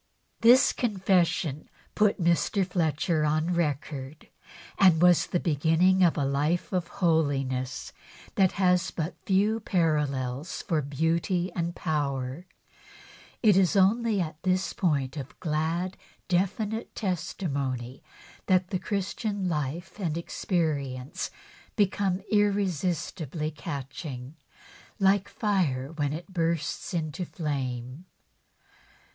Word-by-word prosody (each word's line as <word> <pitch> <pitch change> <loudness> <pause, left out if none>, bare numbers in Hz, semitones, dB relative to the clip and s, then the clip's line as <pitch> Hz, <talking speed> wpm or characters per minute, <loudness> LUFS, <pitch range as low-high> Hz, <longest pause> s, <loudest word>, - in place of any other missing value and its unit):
This 245 +4 +6
confession 185 - +1 0.2
put 210 -1 +2
Mr. 175 +3 +2
Fletcher 165 -2 0
on 155 +3 +1
record, 145 -2 -3 0.5
and 185 -5 +6
was 175 0 +5
the 175 - 0
beginning 165 +4 +3
of 170 -2 +4
a 145 - +1
life 150 +7 0
of 180 -2 0 0.2
holiness 135 -6 0 0.4
that 190 -2 +3
has 180 -2 +2
but 165 +1 -4
few 205 +3 +3
parallels 150 - -1
for 160 -3 0
beauty 165 +6 0
and 170 0 -2
power. 145 0 -2 1.0
It 210 -4 +6
is 190 +1 +3
only 210 +2 +3
at 155 -3 -3
this 185 0 0
point 140 -6 0
of 135 -2 -8
glad, 165 +3 -1 0.3
definite 205 +5 -1
testimony 140 - -3 0.5
that 185 0 +2
Christian 200 0 -2
life 160 +4 -3
and 165 -5 -1
experience 155 -4 -2 0.5
become 195 -2 +1
irresistibly 180 - 0
catching, 140 -1 -6 0.6
like 195 -1 +3
fire 165 - 0
when 145 -3 -1
it 170 +5 -7
bursts 165 -3 -1
into 165 -1 -2
flame. 135 -3 -4
170 Hz, 105 wpm, -27 LUFS, 145-185 Hz, 1.0 s, This